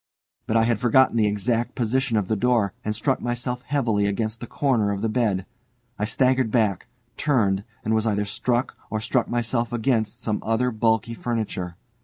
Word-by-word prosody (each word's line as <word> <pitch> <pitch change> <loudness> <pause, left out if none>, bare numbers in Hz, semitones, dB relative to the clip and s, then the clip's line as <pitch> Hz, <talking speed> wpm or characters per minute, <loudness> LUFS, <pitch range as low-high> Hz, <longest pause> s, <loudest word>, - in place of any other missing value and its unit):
But 115 -1 +2
I 115 - +4
had 115 -2 +1
forgotten 125 +2 +4
the 110 -2 +3
exact 115 +4 0
position 125 0 +1
of 100 -3 0
the 110 - +1
door, 115 -2 +2
and 110 -1 -2
struck 130 +5 0
myself 125 +1 -2
heavily 115 -8 +1
against 110 +2 -2
the 120 - -7
corner 120 -8 +1
of 100 +1 -3
the 115 - +1
bed. 110 -5 0 0.5
I 105 - +1
staggered 130 +1 +2
back, 110 -3 +1 0.3
turned, 105 -10 +1 0.2
and 110 - +1
was 110 0 +1
either 105 -1 +1
struck 120 +4 -1
or 110 - -1
struck 115 +3 0
myself 120 0 -1
against 115 -2 0
some 105 -2 -1
other 115 +3 +1
bulky 110 0 +1
furniture. 110 -7 -3
115 Hz, 180 wpm, -24 LUFS, 105-125 Hz, 0.5 s, I